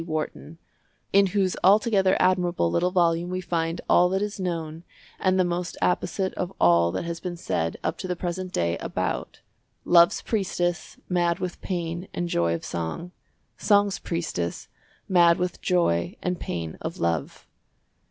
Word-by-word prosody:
Wharton, 155 0 -5 0.6
in 200 0 +6
whose 190 -1 0
altogether 195 0 +4
admirable 180 - +2
little 180 - +2
volume 175 -1 +1
we 185 0 -2
find 165 -2 -2
all 180 0 +5
that 190 +1 0
is 210 -1 -4
known 165 -3 -4 0.4
and 185 0 +2
the - - +5
most 175 0 -3
apposite 95 - 0
of 180 0 -3
all 85 -1 +4
that 95 - -3
has 170 0 -4
been 175 -2 -5
said 80 - -2
up - - -2
to 185 - -4
the 180 - -1
present 180 +1 -4
day 85 - 0
about - - -3 0.4
"Love's 170 -1 +5
priestess, 175 -5 -2
mad 175 -2 +1
with 180 -1 -5
pain 175 -1 -3
and 175 0 -2
joy 85 - +1
of - - -7
song, 85 - -4 0.5
Song's 205 -2 +3
priestess, 165 - -3 0.4
mad 170 -2 +5
with 180 -1 -3
joy 85 - +1
and 180 -1 -1
pain 85 -2 -5
of - - -5
love." 85 -3 -2
175 Hz, 155 wpm, -25 LUFS, 160-185 Hz, 0.6 s, in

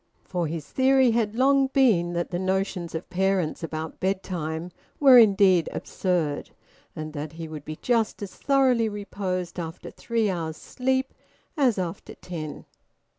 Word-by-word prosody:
For 175 -3 -2
his 155 -1 -5
theory 265 - +4
had 225 -2 0
long 270 +2 +4
been 225 -11 +3
that 175 0 -2
the 175 - -2
notions 190 -2 -1
of 160 - -5
parents 190 -3 0
about 160 -1 -5
bedtime 180 -3 -3 0.3
were 265 -4 +9
indeed 195 -5 +5
absurd, 170 -6 -2 0.5
and 155 0 -6
that 150 +1 -5
he 165 0 -7
would 155 -2 -8
be 155 - -5
just 230 -4 +1
as 195 - -7
thoroughly 260 -5 +2
reposed 190 -4 -4
after 165 0 -6
three 230 -2 -1
hours 165 -4 -3
sleep 260 +1 -1 0.4
as 260 -8 +2
after 175 -3 -5
ten. 155 -4 -7
185 Hz, 145 wpm, -25 LUFS, 165-230 Hz, 0.5 s, were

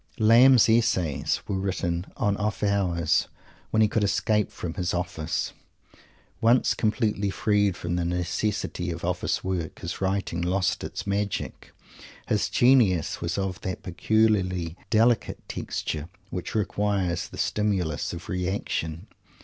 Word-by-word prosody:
Lamb's 120 +3 +7
"essays" 85 - +1
were 95 -2 -1
written 90 -2 -2
at 100 -1 +1
off 105 0 -2
hours, 90 -6 +1 0.4
when 110 0 +3
he - - +5
could 105 0 0
escape 105 +1 +1
from 85 -2 -5
his 90 -2 -2
office. 85 -3 -2 0.9
Once 120 +2 +4
completely 105 -2 0
freed 100 -2 +1
from 85 0 -2
the 90 - 0
necessity 90 +1 -2
of 85 0 -4
office 90 0 -1
work, 90 -4 -3
his - - -5
writing 95 -3 -1
lost 90 +1 0
its - - -5
magic. 100 0 -3 0.6
His - - +1
genius 120 - +3
was 85 +2 -2
of 95 -2 -2
that 95 -2 -4
peculiarly 90 -3 +1
delicate 115 +1 +2
texture 75 +1 -4 0.2
which 90 +3 -5
requires 100 -4 0
the - - -11
stimulus 95 -8 0
of 85 -1 -8
reaction. 90 -2 -2
95 Hz, 130 wpm, -26 LUFS, 85-105 Hz, 0.9 s, Lamb's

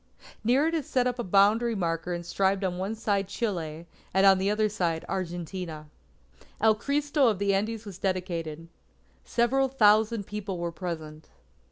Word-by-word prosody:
Near 255 +6 +3
it 325 - 0
is 315 -5 -2
set 250 -1 +1
up 250 0 -1
a - - 0
boundary 210 +5 +3
marker 170 -2 -2
inscribed 190 +3 0
on 180 -1 -2
one 195 +4 -2
side 205 -3 0
Chile, 170 -7 -3 0.3
and 190 +1 +5
on 195 -1 +6
the 195 +1 +1
other, 215 +1 +2 0.4
Argentina. 175 -3 -5 0.7
El 220 -1 +5
Cristo 285 +4 +1
of 215 -4 +2
the 200 0 +1
Andes 215 +3 -1
was 190 -3 -9
dedicated. 170 -4 -3 0.6
Several 255 +3 +2
thousand 220 -3 +3
people 205 -2 -5
were 170 0 -3
present. 160 -3 -7
195 Hz, 155 wpm, -27 LUFS, 175-225 Hz, 0.7 s, on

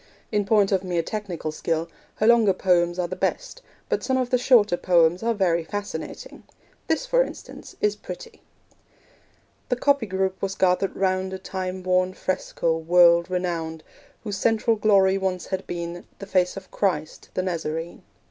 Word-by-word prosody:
In 205 -1 +1
point 205 -1 +3
of 190 -1 +1
mere 175 -2 -1
technical 180 -6 -4
skill, 165 +1 -2 0.3
her 215 - 0
longer 230 -4 +5
poems 175 -2 +2
are 180 -1 -1
the - - -5
best; - - -3 0.3
but - - -1
some 260 -1 +1
of 255 -1 -1
the 250 - +4
shorter 235 -7 +4
poems 175 -1 +3
are 230 0 0
very 170 -4 +1
fascinating. 205 +4 -6 0.5
This, 320 +10 0
for - - +3
instance, - - -7
is 420 -1 +2
pretty: 470 - -10 1.3
The 250 - +2
copyist 275 -3 +1
group 190 0 -1
was 195 0 -2
gathered 185 0 +1
round 190 0 0
A - - -3
time 185 -1 -5
worn 185 0 +1
fresco, 170 -3 -1
world 170 +1 +5
renowned, 165 -3 -3 0.4
Whose 205 -3 -4
central 225 +2 +2
glory 195 -2 +3
once 185 -2 -2
had 190 -1 -4
been 170 0 -5
The 195 - -8
face 185 -1 +1
of 190 -1 -10
Christ, 160 -6 -2
the 185 - 0
Nazarene. 165 -2 -4
190 Hz, 165 wpm, -24 LUFS, 175-210 Hz, 1.3 s, longer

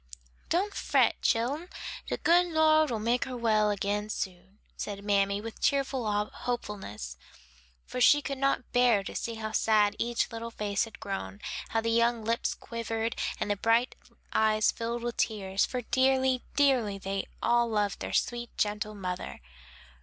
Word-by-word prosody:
"Don't 395 +4 +1
fret, - - +2
chillen, 280 +10 0 0.4
de - - -2
good 350 +1 +4
Lord 315 -2 +4
make 240 +3 +1
her 255 -2 -5
well 215 -3 +3
again 205 +1 -1
soon," 190 -1 -5 0.2
said 200 -1 -5
mammy, 200 -1 +2
with 225 +1 -8
cheerful 265 -5 +1
hopefulness, 195 - -5 0.7
for 250 - -4
she 290 +4 +7
could 275 -1 -4
not 275 -2 0
bear 245 -5 +4
to - - -7
see 230 - -3
how 220 -1 -4
sad 215 -1 +3
each 235 +1 0
little 230 0 -5
face 210 -1 -1
had 225 - -13
grown, 100 - -5 0.3
how 225 - +1
the 230 0 0
young 235 -1 +2
lips 230 +1 0
quivered, 230 -1 -3 0.2
and 205 - -1
the - - +2
bright 230 +5 +2 0.4
eyes 215 0 +3
filled 235 0 -4
with 240 0 -3
tears; 195 -3 0
for 250 - -3
dearly, 260 +1 +2
dearly, 255 -8 +3
they 195 0 -3 0.2
all 240 0 +3
loved 210 -2 0
their - - -4
sweet, 240 -1 0
gentle 210 0 -1
mother. 180 - -5
225 Hz, 155 wpm, -29 LUFS, 205-245 Hz, 0.7 s, she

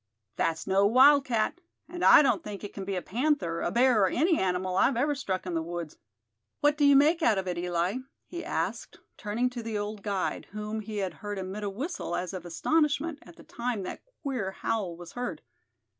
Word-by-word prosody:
"That's 165 -1 -1
no 195 +1 +3
wildcat; 260 +3 +4 0.3
and 350 +1 -6
I - - +8
don't 245 -7 +2
think 210 -1 -7
it 205 - -7
can 195 - -6
be 195 0 -2
a 180 - -3
panther, 235 - 0
a - - 0
bear 245 -2 +4
or 190 - +5
any 320 - +2
animal 185 0 -1
I've 230 +6 +3
ever 290 +4 +2
struck 190 -10 -3
in 180 - -4
the 165 - 0
woods. 170 -1 -6 0.6
What 295 0 +3
do 295 -1 +2
you 285 0 +7
make 310 +5 +4
out 225 -9 +3
of 190 -1 -2
it, 180 - -1
Eli?" 175 +4 -1 0.3
he 345 -1 -7
asked, - - -3 0.2
turning 225 +3 -1
to 245 -1 -5
the 225 -2 -3
old 205 0 -4
guide, 200 -2 -2
whom 210 +1 -4
he 215 0 -6
had 190 -2 -2
heard 205 -1 -4
emit 190 +2 -5
a 205 - -1
whistle, 260 - -4
as 180 +1 -3
of 180 -2 -6
astonishment, 300 - +1
at 175 - -15
the - - -15
time 235 -4 -3
that - - -6 0.2
queer 255 -9 -2
howl 190 -5 -2
was 175 -1 -10
heard. 245 0 -5
210 Hz, 210 wpm, -28 LUFS, 185-270 Hz, 0.6 s, I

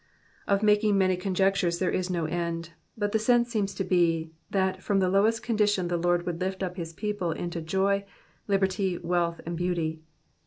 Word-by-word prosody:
Of 200 +1 +2
making 210 -1 +4
many 185 -1 +3
conjectures 185 -1 +1
there 185 +1 0
is 185 0 -1
no 170 -3 -1
end; 170 0 -3 0.3
but 205 -1 -1
the 220 - +2
sense 240 +1 +3
seems 200 -4 -1
to 195 - -1
be, 165 -3 +1 0.2
that 190 -1 0
from 200 0 0
the 185 -1 +2
lowest 220 +4 +3
condition 210 -6 +1
the 175 - 0
Lord 175 0 +1
would 175 0 -3
lift 190 +1 -2
up 180 -1 -3
his 165 -3 -5
people 205 0 -3
into 170 +1 -4
joy, 195 +4 +1 0.4
liberty, 190 -2 +1
wealth, 170 -1 -1
and 170 +1 -3
beauty. 165 -2 -1
185 Hz, 185 wpm, -27 LUFS, 175-200 Hz, 0.4 s, making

